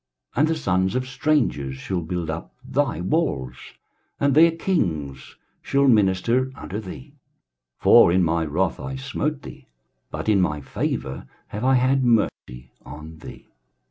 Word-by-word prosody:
23:060:010 - - -1
And 150 - +4
the 165 - 0
sons 95 - 0
of 130 0 -1
strangers 130 - 0
shall 90 +6 -3
build 85 -1 -3
up 80 +1 -7
thy 135 - -1
walls, 90 - -1 0.6
and 140 -1 +2
their 165 +4 +7
kings 85 - -2 0.3
shall 140 0 +2
minister 115 +3 +2
unto 100 - -6
thee: 90 -11 -10 0.6
for - - +6
in 90 +1 +3
my 85 0 +1
wrath 80 +4 -1
I 135 - -5
smote 135 +2 -3
thee, - - -11 0.4
but - - -6
in 105 -3 +4
my 75 -4 0
favour 65 -1 -4 0.2
have 105 +3 -5
I 130 +1 +4
had 130 +1 +2
mercy 65 - 0
on 80 +2 -10
thee. - - -12
100 Hz, 150 wpm, -23 LUFS, 80-135 Hz, 0.6 s, their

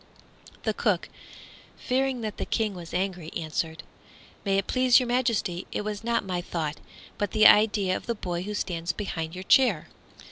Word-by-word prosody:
The - - 0
cook, - - 0 0.7
fearing 260 -1 0
that 215 -2 -4
the - - -3
King 220 -3 0
was 175 -2 -9
angry, 180 -3 -2
answered, 160 0 -3 0.6
"May 195 -1 +1
it 195 - 0
please 255 -1 +5
your 255 - -1
Majesty, 235 -8 0
it - - -2
was 210 0 -4
not 235 -2 0
my 180 -2 -2
thought, 155 -4 -3 0.4
but 205 - -1
the 215 -1 +5
idea 205 -3 +6
of - - -6
the 235 - 0
boy 175 -4 -3
who 210 +3 -4
stands 170 -3 -2
behind 165 -4 -4
your 185 - -6
chair." 210 - +4
195 Hz, 175 wpm, -27 LUFS, 175-225 Hz, 0.7 s, idea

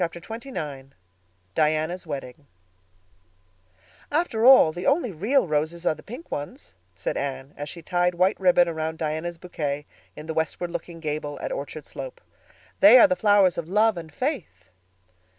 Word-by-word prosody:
_" - - +4
Chapter 170 0 -3
XXIX 155 - -7 0.6
Diana's 155 +3 0
Wedding 140 0 -7 1.6
"After 275 -7 +1
all, 260 -12 +8
the 175 +3 -5
only 275 -5 +2
real 210 - +1
roses 160 +2 -2
are - - +3
the - - -13
pink 250 +10 -10
ones," 145 -9 -6 0.2
said 95 - -3
Anne, 135 0 -4
as 145 0 -6
she 170 +2 -9
tied 175 +1 +1
white 185 +3 +2
ribbon 180 -2 +4
around 160 -1 -3
Diana's 160 +2 -3
bouquet 150 -5 -4 0.3
in 150 - -9
the 160 - -4
westward 160 +2 -2
looking 170 -1 -6
gable 150 -1 -4
at - - -4
Orchard - - -6
Slope. - - -8 0.6
"They 290 -4 +9
are 295 - +8
the 275 - +1
flowers 205 -7 +4
of 165 0 -6
love 215 +2 +3
and 165 -2 -8
faith." 150 - -4
170 Hz, 160 wpm, -25 LUFS, 150-205 Hz, 1.6 s, They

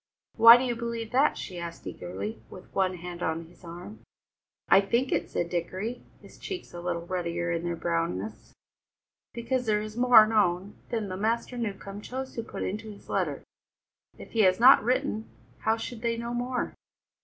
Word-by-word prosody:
"Why 230 +1 +10
do 250 - -1
you 245 -2 -1
believe 230 -1 -4
that?" 270 +4 +3
she 180 -3 -6
asked 170 -1 -7
eagerly, 95 +4 -6
with 185 - -13
one 185 -1 +1
hand 175 0 -8
on 160 0 -2
his 170 - -20
arm. 175 +5 -9 0.7
"I 195 - +7
think 235 +6 0
it," - - 0
said 170 - -1
Dickory, 185 +7 -3 0.2
his - - -15
cheeks 375 -3 -7
a 175 - -7
little 170 -1 -3
ruddier 175 -1 -2
in 170 0 -1
their 170 0 -1
brownness, 165 - -3 0.8
"because 245 +1 -2
there 210 -1 +3
is 215 0 -8
more 245 -2 +7
known 200 -3 +1 0.2
there 225 -3 -2
than 185 0 -5
Master 230 +3 0
Newcombe 205 -3 -5
chose 260 +4 -6
to 230 - -3
put 230 - -6
into 215 +3 -4
his 205 - -13
letter. - - -1 0.7
If - - -11
he 230 - -2
has 185 -2 +5
not 255 +1 +8
written, 245 -2 -1 0.3
how 220 +1 +1
should 225 0 -6
they 230 -1 0
know 235 +1 -4
more?" 245 +1 -2
210 Hz, 180 wpm, -28 LUFS, 175-235 Hz, 0.8 s, Why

